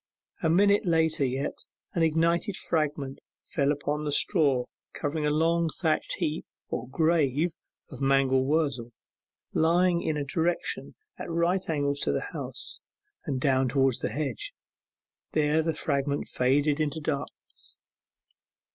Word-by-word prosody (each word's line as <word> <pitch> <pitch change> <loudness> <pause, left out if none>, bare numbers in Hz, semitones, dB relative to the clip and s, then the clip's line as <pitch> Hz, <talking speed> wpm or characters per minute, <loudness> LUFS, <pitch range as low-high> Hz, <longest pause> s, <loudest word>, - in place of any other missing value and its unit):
A 160 - +2
minute 200 +5 +4
later 160 -3 +2
yet, 135 +1 -2 0.3
an 170 - 0
ignited 170 +5 +2
fragment 145 -4 -2 0.2
fell 140 -2 0
upon 145 +1 -2
the 150 - -1
straw 140 -6 +2 0.3
covering 150 +1 -2
of - - +2
a - - +1
long 165 +1 +2
thatched 160 -1 0
heap 155 +1 -2 0.3
or 125 0 -4
'grave' 160 0 +2 0.4
of 135 -1 -9
mangel 135 -1 +3
wurzel, 135 -5 0 0.6
lying 170 +2 +3
in 155 - -1
a 145 - -1
direction 165 +4 -1 0.2
at - - -5
right 170 +3 0
angles 145 -2 0
to 70 - +1
the 70 - -2
house, - - -6 0.5
and 135 -2 -1
down 130 -1 +2
toward 135 0 +3
the - - -1
hedge. 140 -6 -4 0.8
There 155 +1 +3
the 160 0 -1
fragment 140 -2 -1
faded 140 +3 +2 0.2
to 160 - -5
darkness. 145 -2 -6
150 Hz, 140 wpm, -28 LUFS, 140-165 Hz, 0.8 s, minute